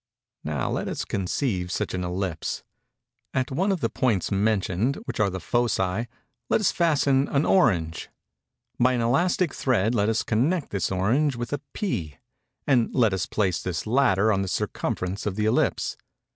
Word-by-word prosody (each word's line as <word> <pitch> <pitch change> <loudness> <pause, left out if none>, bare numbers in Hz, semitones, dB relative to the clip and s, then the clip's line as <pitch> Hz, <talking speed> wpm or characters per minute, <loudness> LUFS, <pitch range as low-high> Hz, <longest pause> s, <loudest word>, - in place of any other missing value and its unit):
Now 75 -4 -2
let - - -2
us - - -3
conceive 95 -1 -2
such - - -2
an 90 -1 -2
ellipse. 90 -2 -3 0.7
At 130 0 0
one 190 +9 +1
of 185 -4 -1
the - - +1
points 110 -9 0
mentioned, 105 +3 +1
which - - -5
are 105 -2 +3
the 95 0 -4
foci, 110 +1 0 0.4
let - - +3
us 215 - +2
fasten 145 -5 +2
an 140 +2 +1
orange. 90 - +2 0.7
By 130 +1 +4
an 120 - 0
elastic 170 +7 +2
thread 115 -4 +1
let 105 -2 +2
us 115 - +1
connect 145 +9 0
this 100 -2 -1
orange 120 +10 +1
with 120 +3 -4
a 145 - -2
pea; 90 - -3 0.5
and 125 -5 +3
let 115 -6 +3
us 95 -1 -1
place 95 -6 0
this 85 -3 -3
latter 110 -4 +3
on 95 - +1
the 95 - -2
circumference 95 +2 -2
of 100 - -2
the 105 0 0
ellipse. 110 - +1
110 Hz, 170 wpm, -25 LUFS, 95-135 Hz, 0.7 s, By